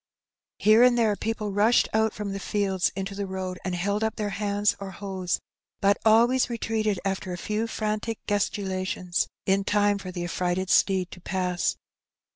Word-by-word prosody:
Here 215 +2 +5
and 245 -1 +6
there 220 -3 +3
people 215 -1 -3
rushed 210 +4 +4
out 220 0 +3
from 205 -2 -5
the 195 - -4
fields 195 -3 0
into 195 +1 -4
the 200 0 -4
road 185 -1 -4
and 180 -1 -2
held 200 +4 -1
up 220 - 0
their 210 -1 -2
hands 205 +1 +1
or 195 -1 -6
hoes, 190 -2 -3 0.4
but 200 0 +3
always 235 +4 +4
retreated 220 -4 -1
after 190 -1 -2
a - - -4
few 215 +5 -2
frantic 215 0 -2
gesticu 205 -1 -1
lations 185 -1 -1 0.2
in 195 +1 +2
time 205 0 +2
for 185 -2 -7
the 175 -1 -4
affrighted 180 +1 -1
steed 190 -2 +3
to 180 - -11
pass. 180 -1 -1
200 Hz, 175 wpm, -26 LUFS, 185-215 Hz, 0.4 s, and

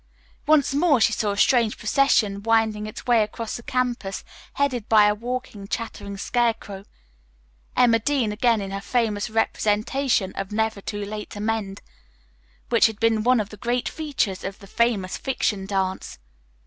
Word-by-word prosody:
Once 300 -3 +4
more 290 -2 +3
she 225 - +3
saw 210 0 0
a 200 - -2
strange 230 0 +3
procession 215 -4 +2
winding 220 -1 +1
its 215 - -9
way 240 -2 +4
across 215 +1 -3
the - - -6
campus 240 -6 -2 0.3
headed 255 -6 -1
by 215 -2 +6
a 210 - +4
walking, 230 -2 -5
chattering 200 -2 -5
scarecrow, 225 -3 -1 0.9
Emma 230 -2 +5
Dean 250 -2 0
again 225 0 +2
in 195 -1 -5
her 195 0 -4
famous 215 -2 -1
representation 220 0 0
of 195 0 -5
"Never 220 -1 -1
Too 205 0 -4
Late 210 +1 -6
to 205 - -8
Mend," 210 -2 -3 0.9
which 235 -1 +5
had 220 -1 -7
been 225 -1 +2
one 250 +2 +3
of 210 -1 -3
the 210 - -11
great 240 +4 -1
features 275 - -2
of 195 0 -5
the - - -14
Famous 205 -3 0
Fiction 210 -7 -1
dance. 190 -1 -2
220 Hz, 160 wpm, -24 LUFS, 205-240 Hz, 0.9 s, by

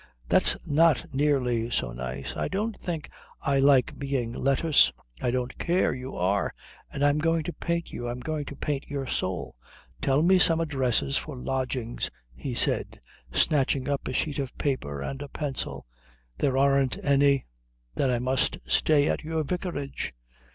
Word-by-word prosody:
"That's - - +4
not 155 -1 +3
nearly 130 -5 +1
so 65 - -1
nice. 65 +2 -5
I - - -1
don't 210 +3 -2
think 165 -4 -4 0.3
I 140 -1 +1
like 135 -2 +4
being 135 -4 -2
lettuce." 140 +4 +4 0.3
"I - - +1
don't 125 +1 -2
care. 175 +2 +2
You 130 +1 -6
are. 95 +3 0 0.4
And 140 - -2
I'm 145 +1 +4
going 165 +1 +1
to 175 - -4
paint 170 0 -2
you. 120 0 -4
I'm 120 +1 -4
going 150 +2 -3
to 145 - -7
paint 140 0 -3
your 140 -1 -3
soul. 80 - -2 0.4
Tell 140 +3 +3
me 185 +2 +5
some 165 -2 +4
addresses 135 -4 +1
for 150 -4 -5
lodgings," 130 -2 -2 0.2
he 120 - -5
said, - - +2 0.3
snatching 135 - +2
up 140 -1 -1
a 130 - -2
sheet 150 +2 -1
of 135 -2 -4
paper 70 - -2
and 135 - -4
a 145 - -5
pencil. 140 -3 -3 0.5
"There 130 -1 +1
aren't 135 -1 +3
any." 140 -1 +4 0.5
"Then 130 - +1
I 125 - +2
must 130 +2 +1
stay 145 - +3
at - - -1
your 160 0 -1
vicarage." 145 - -3
135 Hz, 165 wpm, -27 LUFS, 125-150 Hz, 0.5 s, me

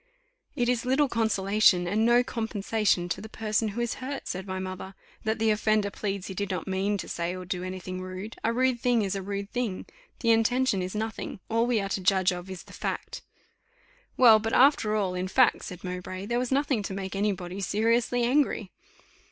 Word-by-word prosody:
"It 240 - +1
is 245 -2 +1
little 265 +3 +2
consolation, 210 -5 +3
and 210 +5 +1
no 240 +1 +5
compensation, 215 -5 0
to - - -2
the 220 - -9
person 220 0 -1
who 215 +3 -3
is 235 0 -1
hurt," 275 +2 -5
said 190 +1 -4
my 190 0 -3
mother, 185 0 -6 0.3
"that 220 +1 +1
the 220 0 +2
offender 215 -1 +1
pleads 195 -1 -3
he 190 - -5
did 200 +1 -3
not 185 0 -3
mean 195 +2 0
to - - -6
say 170 +1 -3
or 185 0 -7
do 180 0 -3
any 185 0 -5
thing 185 +1 -6
rude: 185 +4 -7
a 230 - +2
rude 255 0 +1
thing 240 -2 +2
is 195 - -1
a 195 - -3
rude 200 +1 -5
thing 235 -7 -2 0.4
the 230 - +3
intention 225 -2 +2
is 185 +2 -4
nothing 220 -2 -4
all 230 +1 +2
we 240 -3 +2
are 195 -1 -3
to 195 - -2
judge 185 0 +3
of 180 +1 -6
is 185 -2 -7
the - - -15
fact." - - -4 1.0
"Well, 230 -4 +8
but 225 +1 -3
after 255 -6 +4
all, 195 -4 0
in 180 +1 -2
fact," 245 +5 +3
said 180 -1 -8
Mowbray, 180 +1 -5
"there 240 +3 0
was 250 0 -2
nothing 270 -4 +1
to 195 -1 -5
make 190 0 -5
any 205 +1 +1
body 185 0 -6
seriously 230 +5 +1
angry." 245 -6 +1
210 Hz, 210 wpm, -27 LUFS, 190-230 Hz, 1.0 s, Well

